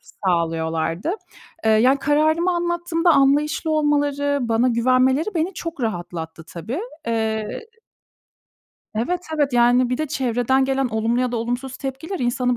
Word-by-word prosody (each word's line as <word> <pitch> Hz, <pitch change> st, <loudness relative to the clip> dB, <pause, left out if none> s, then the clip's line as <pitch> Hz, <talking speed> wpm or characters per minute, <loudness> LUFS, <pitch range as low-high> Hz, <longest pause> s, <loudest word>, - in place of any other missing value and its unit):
sağlıyorlardı. 165 Hz, -, -1 dB, 0.5 s
Iıı, 220 Hz, 0 st, +5 dB
ya 265 Hz, +3 st, +4 dB
kararımı 310 Hz, +5 st, +2 dB
anlattığımda 345 Hz, 0 st, 0 dB
anlayışlı 290 Hz, +3 st, +2 dB
olmaları, 290 Hz, -2 st, +1 dB
bana 230 Hz, +1 st, +2 dB
güvenmeleri 255 Hz, -, +2 dB
beni 340 Hz, +3 st, -1 dB
çok 335 Hz, -4 st, -6 dB
rahatlattı 170 Hz, -6 st, -4 dB
tabii. 190 Hz, -, -5 dB, 0.3 s
Eee 220 Hz, -, -2 dB, 1.3 s
Evet, 270 Hz, +12 st, -1 dB, 0.2 s
evet, 290 Hz, -3 st, +1 dB
yani 245 Hz, +1 st, +4 dB
bir 250 Hz, -, -1 dB
de 310 Hz, -, -1 dB
çevreden 260 Hz, -2 st, +1 dB
gelen 270 Hz, 0 st, 0 dB
olumlu 225 Hz, +2 st, 0 dB
ya 250 Hz, -1 st, -1 dB
da -, -, -1 dB
olumsuz 245 Hz, +3 st, -3 dB
tepkiler 280 Hz, +7 st, -5 dB
insanı 245 Hz, -1 st, 0 dB
255 Hz, 130 wpm, -22 LUFS, 225-300 Hz, 1.3 s, Iıı